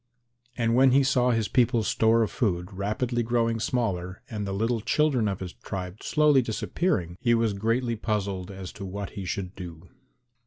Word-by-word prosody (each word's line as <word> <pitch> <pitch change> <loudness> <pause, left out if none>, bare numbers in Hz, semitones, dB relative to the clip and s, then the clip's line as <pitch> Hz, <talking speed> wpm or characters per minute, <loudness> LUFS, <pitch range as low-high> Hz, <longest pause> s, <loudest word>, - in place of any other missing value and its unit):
And 115 -1 +1
when 130 +1 +5
he 140 +1 +5
saw 130 -2 +3
his 115 -3 +1
people's 120 -3 +2
store 115 +1 +3
of 110 - -2
food 90 -4 -1
rapidly 110 +5 -1
growing 115 -1 +1
smaller 100 -7 -2
and 105 -2 -3
the - - -3
little 110 +3 0
children 135 -3 +2
of 95 -2 -3
his 90 -2 -5
tribe 95 0 -6
slowly 150 -3 +4
disappearing, 110 - -1
he 120 -1 +3
was 115 -2 +1
greatly 115 +4 0
puzzled 100 -4 -2
as 95 -2 -7
to 100 - -8
what 100 +1 -5
he 100 -3 -6
should 90 +1 -4
do. 90 -3 -9
110 Hz, 180 wpm, -27 LUFS, 95-120 Hz, -, when